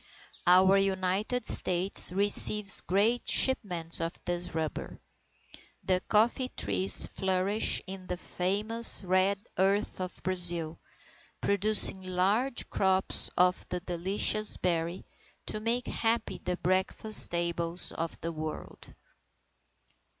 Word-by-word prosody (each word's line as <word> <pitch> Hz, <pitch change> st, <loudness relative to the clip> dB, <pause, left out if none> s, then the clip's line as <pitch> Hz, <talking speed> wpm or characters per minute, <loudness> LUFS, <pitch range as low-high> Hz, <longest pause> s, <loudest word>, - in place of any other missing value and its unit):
Our 185 Hz, +2 st, +4 dB
United 195 Hz, +5 st, -2 dB
States 180 Hz, 0 st, +7 dB
receives 200 Hz, +1 st, +4 dB
great 215 Hz, +6 st, -1 dB
shipments 175 Hz, -11 st, 0 dB
of 165 Hz, +1 st, -5 dB
this 175 Hz, -1 st, -5 dB
rubber. 160 Hz, -1 st, -6 dB, 0.8 s
The 185 Hz, -1 st, -1 dB
coffee 235 Hz, +4 st, 0 dB
trees 95 Hz, -1 st, 0 dB
flourish 190 Hz, +3 st, -2 dB
in 185 Hz, 0 st, -10 dB
the 180 Hz, -, -6 dB
famous 210 Hz, +6 st, +2 dB
red 185 Hz, +2 st, 0 dB, 0.2 s
earth 195 Hz, 0 st, -2 dB
of 185 Hz, 0 st, -8 dB
Brazil, 175 Hz, -3 st, +2 dB, 0.6 s
producing 200 Hz, -1 st, -1 dB
large 195 Hz, +8 st, -2 dB
crops 190 Hz, -1 st, 0 dB
of 180 Hz, 0 st, +1 dB
the 180 Hz, -, -4 dB
delicious 190 Hz, +4 st, -1 dB
berry, 170 Hz, 0 st, -4 dB, 0.4 s
to 215 Hz, -, -6 dB
make 235 Hz, +3 st, -2 dB
happy 230 Hz, +1 st, -4 dB
the 180 Hz, -1 st, -4 dB
breakfast 190 Hz, +4 st, +1 dB
tables 170 Hz, 0 st, -3 dB
of 165 Hz, 0 st, -7 dB
the 165 Hz, -, -5 dB
world. 155 Hz, -1 st, -10 dB
185 Hz, 105 wpm, -27 LUFS, 175-205 Hz, 0.8 s, States